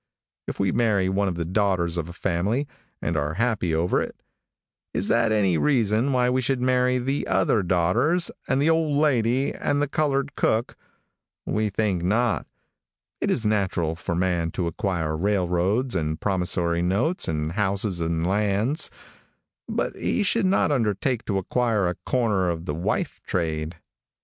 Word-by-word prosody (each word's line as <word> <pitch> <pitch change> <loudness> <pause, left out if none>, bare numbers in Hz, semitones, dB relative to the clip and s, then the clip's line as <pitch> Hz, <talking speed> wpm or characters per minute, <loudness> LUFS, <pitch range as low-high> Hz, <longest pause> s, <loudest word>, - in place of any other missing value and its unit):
If - - -5
we 100 -2 +2
marry 100 -5 +2
one 100 +1 +1
of 90 - -1
the 85 -1 -3
daughters 90 -2 +1
of 85 -1 -3
a - - -8
family, 100 +11 -1 0.4
and 85 - -1
are 75 +1 -1
happy 105 -6 0
over 85 +3 +1
it, - - -6 0.8
is 100 - -1
that 115 -1 +3
any 95 -6 +2
reason 120 -2 +2
why 125 -1 +2
we 130 +1 +1
should 130 +1 0
marry 125 0 +2
the 135 +3 -2
other 110 - +2
daughters 90 - +2 0.2
and 130 - +1
the 145 - +2
old 160 -3 +2
lady 130 -3 +2
and 145 0 -1
the 145 - +1
colored 140 -1 0
cook? 110 +2 0 0.7
We 110 0 0
think 100 -3 0
not. 110 +6 +1 0.7
It - - -1
is 115 - 0
natural 95 -6 0
for 85 0 -3
man 85 -2 0
to 90 - -1
acquire 85 -2 -2
railroads 95 +6 0
and 80 -2 -1
promissory 90 -3 0
notes 105 - 0
and 75 -1 -1
houses 95 -1 -1
and 80 0 0
lands, 105 - 0 0.8
but - - -1
he 215 - 0
should 205 0 +2
not 185 -4 +2
undertake 115 -1 0
to 100 - -1
acquire 110 0 +1
a 90 - 0
corner 105 -8 +1
on 85 0 -3
the 75 - -2
wife 80 +3 -2
trade. 80 -2 -2
100 Hz, 160 wpm, -24 LUFS, 85-125 Hz, 0.8 s, that